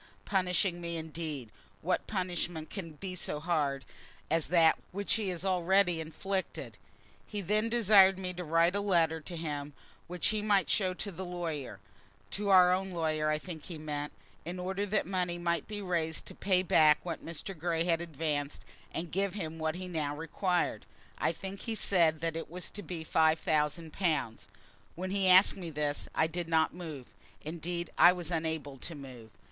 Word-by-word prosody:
Punishing 180 -2 +1
me, 170 -1 -3
indeed! 155 -7 -5 0.3
What 180 +3 0
punishment 175 -4 -2
can 165 -6 -6
be 185 +4 -6
so 160 -4 -2
hard 150 -4 0 0.5
as 165 -1 +2
that 165 -1 +5
which 200 +2 0
he 215 -4 0
has 180 0 -4
already 185 -1 +3
inflicted? 190 +4 -4 0.5
He 210 - -4
then 210 +4 +1
desired 200 -5 +6
me 185 -1 -4
to 180 0 -5
write 165 +3 +3
a 205 - +1
letter 165 -5 +2
to 170 +2 -7
him 145 -3 -4 0.3
which 175 0 0
he 215 -1 0
might 205 -2 +2
show 185 -3 +1
to 200 +2 -4
the 190 +1 -6
lawyer, 165 - -4 0.5
to 205 0 -2
our 180 -2 +7
own 190 +1 -1
lawyer, 155 -3 0
I 155 - +2
think 160 -1 -8
he 170 - -6
meant, 150 -1 -4 0.3
in 175 +2 -5
order 190 +3 -2
that 210 +1 +1
money 180 -1 -1
might 170 -2 -1
be 210 -1 -5
raised 165 -3 -1
to - - -8
pay 185 -2 +2
back 155 -4 +6
what 170 -2 -5
Mr. 170 +4 -5
Grey 165 0 0
had 170 -1 +1
advanced, 150 -3 -3 0.3
and 165 -1 -4
give 195 +2 0
him 165 -5 -4
what 160 0 -1
he 185 0 -5
now 155 -4 -2
required. 175 +4 -1 0.3
I - - +2
think 195 0 -7
he 225 -2 -3
said 165 -6 +2
it 165 0 -2
was 180 +2 -4
to 205 - -6
be 170 -3 -5
five 160 0 +3
thousand 155 +1 0
pounds. 145 - -1 0.5
When 185 +2 -4
he 195 -1 +2
asked 185 +2 +7 0.2
this 150 -1 -1
I 160 - +4
did 170 +1 -3
not 160 -1 +2
move. 160 -7 -7 0.4
Indeed, 170 +2 -3
I 175 - +9
was 175 -2 -5
unable 160 -4 -2
to 165 - -6
move. 130 -5 -10
170 Hz, 180 wpm, -31 LUFS, 160-185 Hz, 0.5 s, I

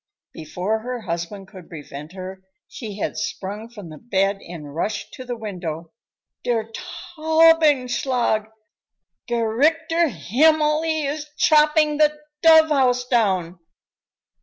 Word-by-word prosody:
Before 180 +7 -3
her 245 +1 -5
husband 175 +2 -5
could 185 -5 -13
prevent 150 0 -9
her, 190 0 -8 0.3
she 210 -5 -8
had - - -3
sprung 205 +4 -5
from 205 -7 -11
the 155 - -11
bed 195 -3 0
and 150 -5 -9
rushed 210 +7 -3
to 255 - -9
the 245 -1 -5
window. 175 -7 -6 0.5
"Der 225 -2 -1
Taubenschlag! 285 -9 +2 0.8
Gerechter 310 +9 +1
Himmel, 300 - +2
he 315 -2 -1
is 300 +2 -4
chopping 300 0 +4
the 300 0 +3 0.2
dove 320 -1 +7
house 250 -4 +2
down!" 190 -8 0
235 Hz, 115 wpm, -22 LUFS, 190-300 Hz, 0.8 s, dove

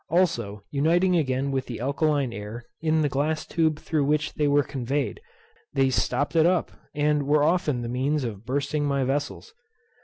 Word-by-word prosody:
Also, 120 - 0
uniting 170 +6 +3
again 135 -3 0
with 135 -1 -2
the 120 - -6
alkaline 140 -1 0
air, 105 +3 -7 0.2
in 160 -1 +2
the - - +3
glass 145 +3 -1
tube 160 -2 +1
through 155 -1 -1
which 150 +1 0
they 150 - +1
were 145 0 +4
conveyed, 135 - -3 0.5
they 135 -1 +2
stopped 145 +4 0
it 165 0 +5
up, 180 -1 +1 0.2
and 150 -1 +1
were 145 0 +4
often 155 -6 +1
the - - -3
means 135 +4 0
of 105 -4 -5
bursting 140 +4 -1
my 140 -1 +1
vessels. 145 - -3
145 Hz, 175 wpm, -25 LUFS, 130-155 Hz, 0.5 s, it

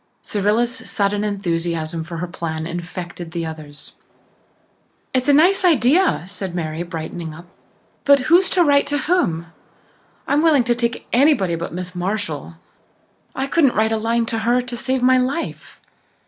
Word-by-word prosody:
Cyrilla's 225 +5 -1
sudden 205 0 0
enthusiasm 170 -5 -2
for 165 +1 -7
her 180 +2 -3
plan 160 -2 -4
infected 175 0 -6
the 170 -1 -2
others. 155 -2 -8 1.2
"It's 255 0 0
a - - +8
nice 350 +7 +4
idea," 300 - +3
said 190 -1 -6
Mary, 160 -1 -3
brightening 165 -1 -6
up. 175 +2 -12 0.6
"But 280 -1 +5
who's 345 +7 +4
to 355 - +6
write 285 -3 +3
to 290 +1 0
whom? 170 - 0 0.7
I'm 290 +1 +2
willing 310 -6 +4
to 240 0 +2
take 235 0 -2
anybody 245 - +3
but 170 0 -4
Miss 180 +1 -6
Marshall. 180 -4 -3 0.8
I 265 - -1
couldn't 275 -2 +2
write 220 +1 +2
a 225 - +1
line 230 +1 0
to 225 0 -2
her 240 +3 +2
to 250 -1 -4
save 255 +1 -1
my 255 0 +5
life. 270 +6 -3
210 Hz, 155 wpm, -20 LUFS, 170-260 Hz, 1.2 s, a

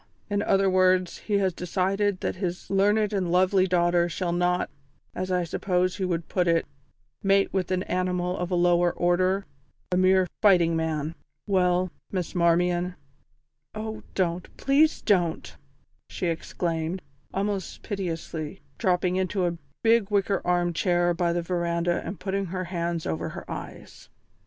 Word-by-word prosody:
In 205 0 +1
other 195 -2 +3
words, 185 -1 +3
he 210 - -2
has 190 -2 +1
decided 190 +3 0
that - - -2
his 180 -1 -4
learned 205 +2 +3
and 185 -4 0
lovely 185 +1 +4
daughter 175 -1 +2
shall 175 0 -2
not, 180 +1 +1 0.4
as 185 0 -3
I 180 -1 +2
suppose 180 +2 0
he 190 - -1
would 170 -2 -2
put 180 -2 0
it, 165 -1 +3 0.6
mate 195 0 +3
with 190 -3 0
an 185 0 0
animal 180 0 -1
of 180 -1 -3
a 180 - 0
lower 175 0 +3
order 185 +3 +1 0.5
a 180 - +2
mere 185 0 +4 0.2
fighting 175 -5 +5
man. 160 -1 -1 0.3
Well, 180 -2 +2 0.2
Miss 180 -3 -3
Marmion 175 +1 +2 0.4
" 135 +8 -32
"Oh, 220 0 -5
don't; 180 -1 -1
please 295 +3 +3
don't!" 175 -6 +1 0.5
she - - -4
exclaimed, 165 +1 -3 0.3
almost 195 -1 -3
piteously, 165 -6 -4 0.2
dropping 180 0 +1
into 190 0 0
a 175 -1 0 0.3
big 225 -3 +4
wicker 200 -1 +1
armchair 175 0 +1
by 170 0 0
the 170 0 -1
verandah 170 0 0
and 175 0 -6
putting 195 0 -2
her 185 +1 -3
hands 170 -2 -3
over 80 +1 -2
her - - -8
eyes. - - -9
180 Hz, 150 wpm, -26 LUFS, 175-190 Hz, 0.6 s, fighting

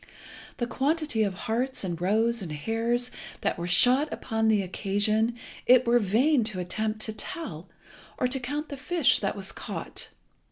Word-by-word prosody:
The 240 - -1
quantity 280 0 0
of 200 -3 +1
harts 245 +5 -1
and 175 -3 -3
roes 225 +5 +2
and 175 -5 -5
hares 230 +9 -1 0.3
that - - -1
were 170 - -3
shot 250 +11 +4
upon 220 -2 -1
the 215 -2 +3
occasion 215 +5 0 0.3
it 255 0 +6
were 240 +1 +4
vain 240 +7 +3
to 215 -4 -1
attempt 215 +4 -2
to 220 - 0
tell, 210 - -5 0.5
or 250 - +1
to 265 +2 -1
count 290 +5 -4
the 280 - -6
fish 320 +1 +3
that 195 -1 -1
was 195 -1 -4
caught. - - -5
225 Hz, 165 wpm, -27 LUFS, 200-255 Hz, 0.5 s, it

